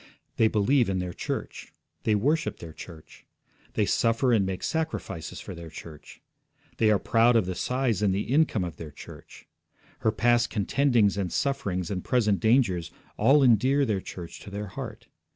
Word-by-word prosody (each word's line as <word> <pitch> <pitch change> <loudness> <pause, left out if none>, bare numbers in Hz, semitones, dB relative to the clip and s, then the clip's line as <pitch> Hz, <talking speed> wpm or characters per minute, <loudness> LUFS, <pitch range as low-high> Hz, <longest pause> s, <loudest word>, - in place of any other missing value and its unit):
They 110 - +5
believe 110 +3 +2
in 95 - 0
their 90 -1 -3
church. - - -5 0.3
They 110 - +3
worship 150 +10 0
their 80 -2 -10
church. 80 -2 -13 0.5
They - - +1
suffer 115 +2 +2
and 105 -4 +3
make 95 -1 -4
sacrifices 160 - -3
for - - -8
their 85 -1 -9
church. 80 -1 -12 0.5
They 110 - +3
are 105 - +4
proud 115 +4 +3
of 110 -5 +3
the 95 - -3
size 125 +2 -1
and 100 -2 +3
the 95 +2 0
income 135 - +1
of 85 -2 -6
their 80 - -7
church; 75 - -13 0.5
her 110 - +2
past 120 +2 +2
contendings 115 -1 +2
and 95 -4 -2
sufferings, 105 -11 -1
and 90 -2 -3
present 110 -6 +1
dangers, 110 -8 +2 0.3
all 135 +6 +4
endear 130 +4 +4
their 105 -5 -1
church 85 -2 -9
to - - -11
their 100 0 -5
heart. 90 - -8
110 Hz, 170 wpm, -27 LUFS, 95-125 Hz, 0.5 s, They